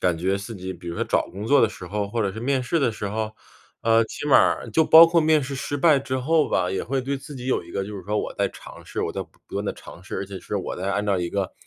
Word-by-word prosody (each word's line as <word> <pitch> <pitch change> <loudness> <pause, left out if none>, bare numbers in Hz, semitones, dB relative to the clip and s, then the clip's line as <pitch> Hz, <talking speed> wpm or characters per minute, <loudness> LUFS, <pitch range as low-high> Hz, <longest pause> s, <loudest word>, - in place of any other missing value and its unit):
感 90 -2 +1
觉 95 +3 0
自己， 100 -2 -6
比 85 -1 -10
如 85 - -5
说 - - 0
找 - - +1
工 100 +3 -7
作 145 +4 +5
的 115 - +4
时 100 -3 -10
候、 100 +2 -2
或 115 +3 -2
者 100 -3 0
是 110 - -7
面 135 +2 +1
试 155 +6 0
的 135 - +2
时 105 -2 -5
候， 110 +1 -2 0.5
呃， 115 0 +4
起 145 - -6
码 145 - +6
儿 - - +2
就 160 - +3
包 160 +2 +9
括 170 0 +3
面 155 -1 +4
试 135 +1 -5
失 140 +1 -3
败 150 +1 +5
之 130 -1 -3
后 155 +4 +2
吧， 90 -1 +1
也 95 - -2
会 135 +2 -1
对 135 +2 -2
自 140 +1 -10
己 125 0 -7
有 130 - +1
一 - - -14
个 95 - -2
就 105 +2 -7
是 95 - -8
说： 105 +1 -1
“我 - - -4
在 - - 0
尝 - - -13
试， - - -5
我 - - -2
在 - - -3
不 - - -17 0.2
不 - - -12
断 - - -2
地 - - -1
尝 85 - -13
试， 90 - -6
而 100 - -3
且 95 -1 -8
是 105 - -4
我 95 - -4
在 95 +2 -3
按 105 +1 -1
照 100 -2 +2
一 90 -1 -2
个 100 -2 -2
110 Hz, 345 characters per minute, -24 LUFS, 95-135 Hz, 0.5 s, 包